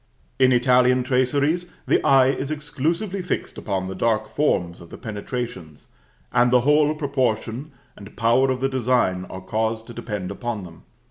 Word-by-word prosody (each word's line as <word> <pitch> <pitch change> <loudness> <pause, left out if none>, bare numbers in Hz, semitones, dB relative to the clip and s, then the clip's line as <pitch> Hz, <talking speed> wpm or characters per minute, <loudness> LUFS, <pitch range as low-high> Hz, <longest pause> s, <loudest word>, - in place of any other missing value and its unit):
In 130 -1 +5
Italian 125 0 +4
traceries 140 +7 +1
the - - +2
eye 135 -1 +5
is 135 0 -2
exclusively 160 +6 -2
fixed 180 - -3
upon 95 -3 -2
the 95 - -5
dark 110 +3 0
forms 90 - 0
of 85 - -13
the - - -10
penetrations, 110 - -6 0.4
and 120 0 +4
the 125 0 +4
whole 150 +3 +3
proportion 130 -2 -2 0.2
and 100 0 -13
power 120 +3 +3
of 130 -1 -1
the 135 - +2
design 120 -8 +1
are 95 - -8
caused 110 +3 -2
to 120 - -10
depend 105 -5 -5
upon 115 -1 -4
them. 85 -2 -13
125 Hz, 160 wpm, -23 LUFS, 110-135 Hz, 0.4 s, In